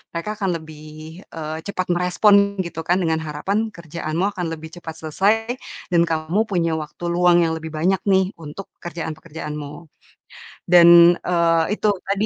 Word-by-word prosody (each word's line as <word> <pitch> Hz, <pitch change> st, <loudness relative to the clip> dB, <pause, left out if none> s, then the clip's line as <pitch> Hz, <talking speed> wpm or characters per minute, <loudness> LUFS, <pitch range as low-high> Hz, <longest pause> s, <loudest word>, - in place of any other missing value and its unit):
mereka 210 Hz, +6 st, -3 dB
akan 195 Hz, -2 st, -1 dB
lebih, 155 Hz, +2 st, -12 dB
eee, 155 Hz, -1 st, -5 dB
cepat 185 Hz, -2 st, -3 dB
merespon 200 Hz, +3 st, +3 dB
gitu 165 Hz, -1 st, -6 dB
kan. 180 Hz, +2 st, +3 dB
Dengan 160 Hz, -1 st, 0 dB
harapan 200 Hz, +9 st, -2 dB
kerjaanmu 170 Hz, +1 st, -3 dB
akan 180 Hz, -2 st, -3 dB
lebih 160 Hz, 0 st, -8 dB
cepat 160 Hz, -, -6 dB
selesai 190 Hz, +7 st, +2 dB, 0.6 s
dan 170 Hz, -1 st, +4 dB
kamu 160 Hz, +7 st, 0 dB
punya 165 Hz, -4 st, 0 dB
waktu 155 Hz, +2 st, -7 dB
luang 175 Hz, 0 st, +4 dB
yang 160 Hz, -, -2 dB
lebih 160 Hz, -1 st, -8 dB
banyak 180 Hz, +5 st, +1 dB
nih 190 Hz, -1 st, +2 dB
untuk 165 Hz, +4 st, -9 dB
pekerjaan-pekerjaanmu. 155 Hz, -2 st, -7 dB, 0.8 s
Dan, 170 Hz, 0 st, +8 dB
eee, 165 Hz, -2 st, +2 dB
itu 215 Hz, -, +1 dB, 0.2 s
tadi 200 Hz, +2 st, 0 dB
170 Hz, 145 wpm, -21 LUFS, 160-185 Hz, 0.8 s, Dan